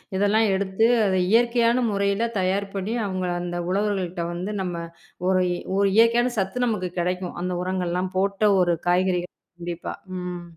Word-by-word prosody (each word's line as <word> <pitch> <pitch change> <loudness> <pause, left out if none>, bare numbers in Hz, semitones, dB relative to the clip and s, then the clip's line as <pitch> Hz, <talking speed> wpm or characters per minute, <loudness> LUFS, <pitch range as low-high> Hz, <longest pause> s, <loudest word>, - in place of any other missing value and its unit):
இதெல்லாம் 205 +3 +3
எடுத்து, 195 +3 +1 0.2
அத 190 -1 +2
இயற்கையான 235 +1 +3
முறையில 200 +3 0
தயார் 195 +2 0
பண்ணி 200 +4 -2
அவங்க 185 -2 -2
அந்த 175 0 -3
உழவர்கள்கிட்ட 190 -3 -1
வந்து 185 +5 -4
நம்ம 180 -2 -3 0.5
ஒரு 185 -1 +3 0.3
ஒரு 200 0 +4
இயற்கையான 235 +2 +4
சத்து 195 +6 0
நமக்குக் 185 -6 -2
கெடைக்கும். 180 +1 -2
அந்த 180 0 -2
உரங்கள் 185 -1 -2
எல்லாம் 185 +1 -2
போட்ட 200 +2 +2
ஒரு 175 -1 +2
காய்கறி 180 0 +2 0.4
கண்டிப்பா, 175 0 -5 0.3
ம். 180 -1 -5
190 Hz, 150 wpm, -24 LUFS, 180-210 Hz, 0.5 s, ஒரு